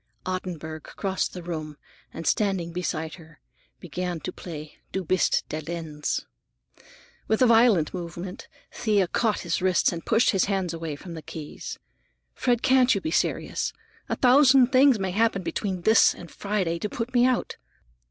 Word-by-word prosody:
Ottenburg 175 Hz, -4 st, -4 dB
crossed 190 Hz, +3 st, -3 dB
the 180 Hz, -, -7 dB
room 155 Hz, -3 st, -5 dB, 0.3 s
and 165 Hz, -, -7 dB
standing 190 Hz, -6 st, 0 dB
beside 160 Hz, -3 st, -3 dB
her 160 Hz, -1 st, -17 dB, 0.4 s
began 180 Hz, 0 st, -4 dB
to -, -, -4 dB
play 155 Hz, -3 st, -9 dB
"Du 190 Hz, -, -2 dB
bist 185 Hz, +3 st, +1 dB
der 155 Hz, -, -3 dB
Lenz." 160 Hz, -2 st, -4 dB, 1.0 s
With 220 Hz, -, +1 dB
a -, -, +7 dB
violent 225 Hz, -9 st, +4 dB
movement 180 Hz, +3 st, -6 dB, 0.3 s
Thea 210 Hz, -5 st, +1 dB
caught 220 Hz, +4 st, 0 dB
his 175 Hz, 0 st, -1 dB
wrists 185 Hz, -1 st, +3 dB
and 170 Hz, -2 st, -6 dB
pushed 225 Hz, +2 st, +3 dB
his 195 Hz, -, +2 dB
hands 190 Hz, -4 st, -1 dB
away 165 Hz, -2 st, -4 dB
from 170 Hz, +4 st, -9 dB
the 160 Hz, -, -7 dB
keys. 155 Hz, 0 st, -8 dB, 0.6 s
"Fred, 245 Hz, -2 st, 0 dB
can't 260 Hz, -2 st, +5 dB
you -, -, 0 dB
be 160 Hz, -4 st, -4 dB
serious? -, -, -1 dB, 0.4 s
A -, -, 0 dB
thousand 260 Hz, 0 st, +6 dB
things 265 Hz, -1 st, +6 dB
may 190 Hz, -2 st, -2 dB
happen 210 Hz, -1 st, +1 dB
between 185 Hz, +1 st, -3 dB
this 220 Hz, +3 st, +5 dB
and 170 Hz, -, -11 dB
Friday 190 Hz, -5 st, -2 dB
to 210 Hz, -, -3 dB
put 240 Hz, +3 st, -4 dB
me 245 Hz, 0 st, +5 dB
out. 255 Hz, -1 st, -1 dB
185 Hz, 160 wpm, -26 LUFS, 165-220 Hz, 1.0 s, a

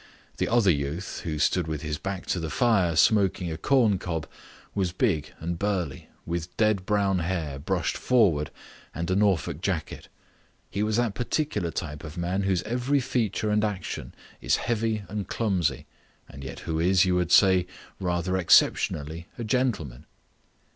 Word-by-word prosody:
The -, -, 0 dB
other 115 Hz, -5 st, +4 dB
youth, 75 Hz, +5 st, -3 dB
who 80 Hz, -3 st, -2 dB
stood 85 Hz, +3 st, +1 dB
with 80 Hz, -2 st, -4 dB
his 75 Hz, -1 st, -3 dB
back 95 Hz, -1 st, -4 dB
to 90 Hz, -, -2 dB
the 80 Hz, -1 st, -3 dB
fire 95 Hz, -6 st, +2 dB
smoking 95 Hz, -1 st, +3 dB
a -, -, -3 dB
corncob, 95 Hz, -, +1 dB, 0.5 s
was 95 Hz, -3 st, 0 dB
big 85 Hz, -, 0 dB
and 85 Hz, +1 st, -4 dB
burly, 95 Hz, -9 st, -2 dB, 0.2 s
with 85 Hz, +1 st, -4 dB
dead 105 Hz, -4 st, +2 dB
brown 100 Hz, -3 st, +2 dB
hair 85 Hz, -5 st, -2 dB
brushed 90 Hz, +4 st, -1 dB
forward 95 Hz, -, +3 dB, 0.5 s
and 85 Hz, +2 st, -2 dB
a -, -, +2 dB
Norfolk 95 Hz, -6 st, +1 dB
jacket. 90 Hz, -5 st, -3 dB, 0.6 s
He 100 Hz, -, -2 dB
was 110 Hz, +1 st, +1 dB
that 120 Hz, -4 st, +1 dB
particular 125 Hz, -, -1 dB
type 75 Hz, -2 st, -5 dB
of 80 Hz, +1 st, -8 dB
man 90 Hz, +3 st, -1 dB
whose 95 Hz, -2 st, +1 dB
every 125 Hz, +5 st, 0 dB
feature 110 Hz, -4 st, -1 dB
and 105 Hz, 0 st, +2 dB
action 100 Hz, -4 st, -4 dB, 0.3 s
is -, -, +2 dB
heavy 110 Hz, -2 st, -1 dB
and 105 Hz, -2 st, -4 dB
clumsy, 95 Hz, -7 st, 0 dB, 0.4 s
and 70 Hz, -, -11 dB
yet 65 Hz, -, -7 dB
who 80 Hz, -1 st, -2 dB
is, 90 Hz, +2 st, +4 dB
you 90 Hz, -, +2 dB
would 90 Hz, -1 st, 0 dB
say, 95 Hz, -2 st, +5 dB, 0.3 s
rather 90 Hz, 0 st, 0 dB
exceptionally 80 Hz, -2 st, +3 dB
a 120 Hz, -, -4 dB
gentleman. 100 Hz, -, -1 dB
95 Hz, 160 wpm, -26 LUFS, 80-105 Hz, 0.6 s, say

